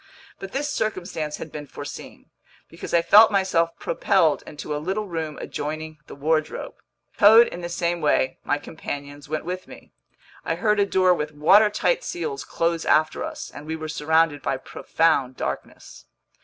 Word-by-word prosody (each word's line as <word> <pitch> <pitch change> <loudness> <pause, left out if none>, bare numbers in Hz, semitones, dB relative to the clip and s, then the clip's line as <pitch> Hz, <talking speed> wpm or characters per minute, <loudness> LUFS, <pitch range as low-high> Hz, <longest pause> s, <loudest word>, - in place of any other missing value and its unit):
But 195 - -8
this 285 +2 -2
circumstance 180 - -3
had 160 - -8
been 150 -1 -7
foreseen, - - -10 0.4
because - - -9
I 170 -1 +3
felt 215 +5 +8
myself 185 -4 +1
propelled 165 -3 +1
into 150 0 -6
a 150 - -3
little 195 +6 -2
room 160 -4 -4
adjoining 155 +1 -5
the - - -10
wardrobe. 155 +2 -1 0.5
Towed 225 +3 +8
in 175 - -8
the 175 - -5
same 170 0 -1
way, 130 -3 +1
my 145 - 0
companions 145 -2 -8
went 155 0 -3
with 185 +1 -5
me. - - -14 0.5
I - - -1
heard 210 -2 +1
a 200 - +3
door 185 -2 +4
with 150 -3 -3
watertight 210 - +4
seals 415 +4 -4
close 165 0 -1
after 155 0 +2
us, - - -6
and 150 - -10
we 160 - -3
were 155 -1 -6
surrounded 160 -1 +1
by 135 - -1
profound 135 -2 0
darkness. - - -6
165 Hz, 165 wpm, -24 LUFS, 150-190 Hz, 0.5 s, felt